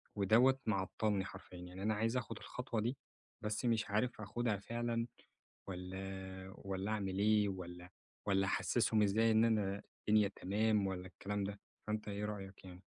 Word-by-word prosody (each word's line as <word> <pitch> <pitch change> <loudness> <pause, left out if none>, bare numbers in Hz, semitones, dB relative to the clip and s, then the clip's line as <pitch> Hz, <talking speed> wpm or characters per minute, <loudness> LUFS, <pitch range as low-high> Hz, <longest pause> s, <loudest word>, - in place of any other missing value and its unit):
ودوّة 120 +7 +5
معطلني 100 0 +1
حرفيًا. 90 - -9
يعني 90 +2 -7
أنا 110 +1 +2
عايز 115 +4 +1
آخد 115 -3 -3
الخطوة 125 -3 -3
دي، 120 +4 -1 0.4
بس 105 +3 -1
مش 115 -2 +2
عارف 110 +2 +1
آخدها 110 +1 0
فعلًا 115 +2 -1 0.6
والّا 95 0 -5
والّا 95 +1 -3
أعمل 100 -3 -1
إيه؟ 105 0 +4
والّا 90 -1 -6 0.4
والّا 95 -1 +3
أحسسهم 110 +1 +2
إزاي 110 +3 +4
إن 110 +1 +6
أنا 100 -3 +1 0.3
الدنيا 105 -1 +6
تمام 105 +1 +2
والّا 95 -1 -3
الكلام 100 +3 -3
ده، 100 +1 -4 0.3
فانتَ 105 0 -2
إيه 105 0 -2
رأيك 100 -2 -6
يعني؟ 90 0 -10
105 Hz, 155 wpm, -37 LUFS, 95-110 Hz, 0.6 s, إن